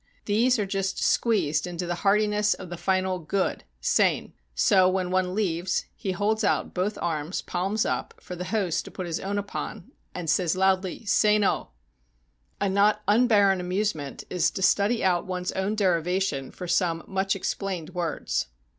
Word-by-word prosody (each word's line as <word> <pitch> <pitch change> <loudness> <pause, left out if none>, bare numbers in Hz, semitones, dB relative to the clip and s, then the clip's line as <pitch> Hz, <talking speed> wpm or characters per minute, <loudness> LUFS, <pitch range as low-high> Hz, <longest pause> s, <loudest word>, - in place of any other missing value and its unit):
These 235 +5 +3
are 210 - 0
just 195 0 -2
squeezed 180 -9 +1
into 175 0 -4
the 175 - -1
heartiness 210 +1 +3
of 180 - -9
the - - -3
final 185 +1 0
"good" 180 +4 -2 0.2
{sein). - - +2 0.2
So 185 - +4
when 185 -1 -1
one 185 0 0
leaves, 180 -3 0
he 195 - -3
holds 215 +4 0
out - - +1
both 190 +4 -1
arms, 160 0 -2
palms 195 +5 -1
up, - - -2
for 180 - -8
the 180 +1 -5
host 190 -6 0
to - - -8
put 185 - -6
his 170 -1 -3
own 200 +1 -3
upon, 205 -1 -5 0.2
and 175 -2 -5
says 170 +2 +1
loudly, 190 +2 +1
"Sein 210 0 +3
oh!" - - 0 0.9
A 200 - +1
not 205 +2 +3
unbarren 205 -3 +4
amusement 180 -5 -2
is 180 - +2
to 190 - -4
study 210 +5 +3
out 180 -2 +1
one's 180 -1 -2
own 195 +3 -1
derivation 180 -6 0
for 180 - -8
some 170 -1 +1
much 195 0 0
ex 195 - -1
plained 185 -5 -5
words. 165 - -2
190 Hz, 170 wpm, -26 LUFS, 175-205 Hz, 0.9 s, So